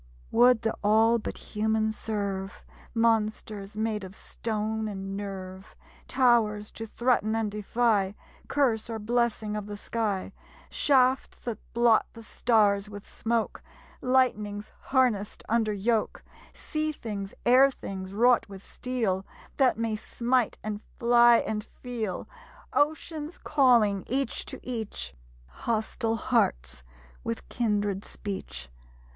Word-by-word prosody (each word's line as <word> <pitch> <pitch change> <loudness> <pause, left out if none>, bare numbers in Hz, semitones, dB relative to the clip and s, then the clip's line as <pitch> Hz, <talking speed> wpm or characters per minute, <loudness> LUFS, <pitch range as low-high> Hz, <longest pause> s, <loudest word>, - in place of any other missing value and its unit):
Would 245 0 +5
the 225 - 0
all 220 +3 +4
but - - -5
human 220 +1 0
serve! 200 -3 -4 0.3
Monsters 215 -2 0
made 215 -1 -1
of 190 0 -9
stone 220 0 -3
and 195 -1 -5
nerve; 190 -1 -7 0.3
Towers 220 -5 +2
to 225 - -7
threaten 230 -2 +1
and 220 -2 0
defy 210 -1 +1 0.3
Curse 240 -6 +1
or 225 - -3
blessing 220 -1 0
of 210 -1 -4
the 205 0 -6
sky; 205 -3 -2 0.4
Shafts 260 -2 +3
that 230 -3 -4
blot 235 -1 +4
the 230 - -11
stars 210 -3 +2
with 205 -1 -9
smoke; 230 -1 -2 0.4
Lightnings 215 -5 +1
harnessed 245 -7 +1
under 225 -1 +2
yoke; 215 +2 0 0.3
Sea 310 0 -2
things, 205 -8 -6
air 260 +3 +7
things, 190 -7 -7
wrought 235 +2 +3
with 195 -1 -10
steel, 225 -7 -2 0.3
That 260 -4 +4
may 225 -1 -1
smite, 240 +2 0
and 210 -1 -4 0.2
fly, 240 0 +6
and 210 -1 -2 0.2
feel! 235 -6 -3 0.5
Oceans 310 +1 0
calling 235 -9 +3
each 270 +2 -1
to - - -7
each; 220 - -4 0.3
Hostile 225 - -2
hearts, 60 - 0 0.4
with 115 - -4
kindred 205 -4 0
speech. 190 - -6
220 Hz, 120 wpm, -28 LUFS, 205-240 Hz, 0.5 s, air